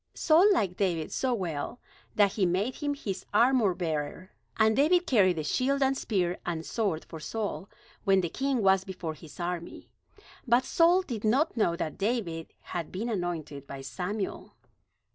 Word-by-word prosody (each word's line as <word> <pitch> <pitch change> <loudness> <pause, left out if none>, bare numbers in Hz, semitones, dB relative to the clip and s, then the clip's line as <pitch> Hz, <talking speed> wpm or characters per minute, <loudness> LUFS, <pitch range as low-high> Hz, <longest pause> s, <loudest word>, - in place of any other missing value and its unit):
Saul 350 +6 +5
liked 195 - +1
David 170 -6 0
so 260 - 0
well 180 +3 -4 0.4
that 205 -2 +4
he 205 - 0
made 190 +8 0
him 290 -1 -1
his 195 -9 -5
armorbearer; 185 - +1 0.3
and 220 0 +4
David 345 +6 +4
carried 195 - +4
the 155 - -2
shield 270 - +1
and 270 0 +2
spear, 180 -8 -1
and 165 -2 -3
sword 195 -9 -1
for 160 - -9
Saul, 205 +3 -4 0.3
when 195 -1 +4
the 170 - -2
king 265 +2 -1
was 190 -1 +4
before 180 -4 -5
his 155 +1 -14
army. 175 -1 -5 0.6
But 240 +2 +4
Saul 345 +3 +4
did 235 - -5
not 260 +9 +2
know 190 -7 +2
that 155 -3 -4
David 195 -7 -2
had 170 -3 -5
been 220 +6 -3
anointed 165 - -4
by 135 -1 -7
Samuel. 190 +9 -4
195 Hz, 160 wpm, -29 LUFS, 170-245 Hz, 0.6 s, Saul